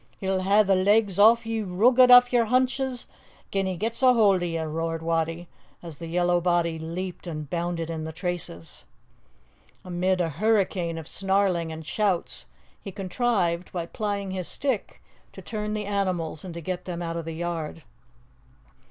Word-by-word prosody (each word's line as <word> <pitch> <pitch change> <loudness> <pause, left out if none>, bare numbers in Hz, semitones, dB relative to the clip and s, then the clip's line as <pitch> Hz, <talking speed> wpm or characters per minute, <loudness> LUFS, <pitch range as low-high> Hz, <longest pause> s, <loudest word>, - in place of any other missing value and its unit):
He'll 190 -1 -1
hae 200 +3 +4
the 195 -1 +2
legs 200 +1 +3
o' 225 +3 +8
ye 225 -1 -2
roogit 240 +7 +4
aff 245 0 +8
yer 235 -2 +4
henches 255 +1 0 0.5
gin 195 -1 0
he 185 -1 -3
get's 225 +6 -1
a 255 -1 +6
haud 200 -5 +4
o' - - -1
ye!" 165 -1 -2
roared 165 +1 -3
Wattie, 165 +1 -1 0.4
as 165 -4 -8
the 165 - -6
yellow 175 +1 +1
body 170 -2 +1
leaped 175 +3 -6
and 155 -3 -5
bounded 170 +1 -3
in 160 -1 -4
the 160 - -5
traces. 170 - -5 1.0
Amid 185 +1 0
a 170 -2 +1
hurricane 185 -1 0
of 160 -1 -7
snarling 190 -4 0
and 160 0 -8
shouts 195 0 -1 0.3
he 195 - -7
contrived, 185 -3 -1
by 175 -2 -3
plying 200 0 -3
his 185 -2 -4
stick, 265 -7 -3 0.3
to - - -10
turn 210 -1 -4
the 210 -1 -3
animals 185 -6 -2
and 180 -3 -8
to 170 - -6
get 180 +2 -4
them 175 -1 -4
out 165 0 -4
of 165 -1 -4
the 165 -1 -5
yard. 165 -2 -4
180 Hz, 170 wpm, -25 LUFS, 165-205 Hz, 1.0 s, o